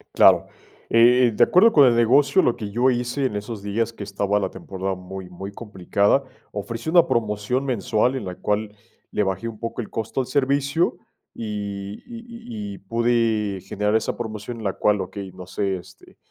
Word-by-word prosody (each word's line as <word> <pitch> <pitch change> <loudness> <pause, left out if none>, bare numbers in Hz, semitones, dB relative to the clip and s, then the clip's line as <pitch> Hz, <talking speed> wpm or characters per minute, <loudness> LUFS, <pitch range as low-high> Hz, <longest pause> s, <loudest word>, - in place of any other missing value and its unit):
Claro. - - +6 0.4
Eh, 120 +1 +5
de - - +6
acuerdo 225 +6 +5
con 145 -3 +7
el 120 - +4
negocio, 135 +8 +4
lo 120 - +2
que 105 -4 -6
yo 125 +5 +3
hice 125 +3 -1
en 105 - -3
esos 105 0 -5
días 115 +3 -1
que 105 - -9
estaba 100 0 0
la 95 - -2
temporada 95 +1 -4
muy 95 0 -8
muy 95 +3 -8
complicada, 100 +4 0 0.3
ofrecí 115 +7 -5
una 170 +1 +5
promoción 110 +3 0
mensual 120 +1 +1
en 130 - -4
la 90 -1 -6
cual 105 0 -2 0.4
le - - 0
bajé 95 +3 -2
un 110 - -8
poco 115 +2 -4
el - - -10
costo 110 +4 -3
al 125 - -1
servicio 140 +3 +1 0.4
y 100 -2 -5
y 235 -1 -8 0.5
y - - -7
y - - -11
pude 115 -2 0
generar 105 +3 -1
esa 110 - -1
promoción 110 0 -6
en 110 - -8
la 100 - 0
cual, 105 +1 +1
okey, 95 +1 -7
no 90 -1 -10
sé, 95 0 -1
este, 90 - -14
110 Hz, 190 wpm, -23 LUFS, 100-120 Hz, 0.5 s, con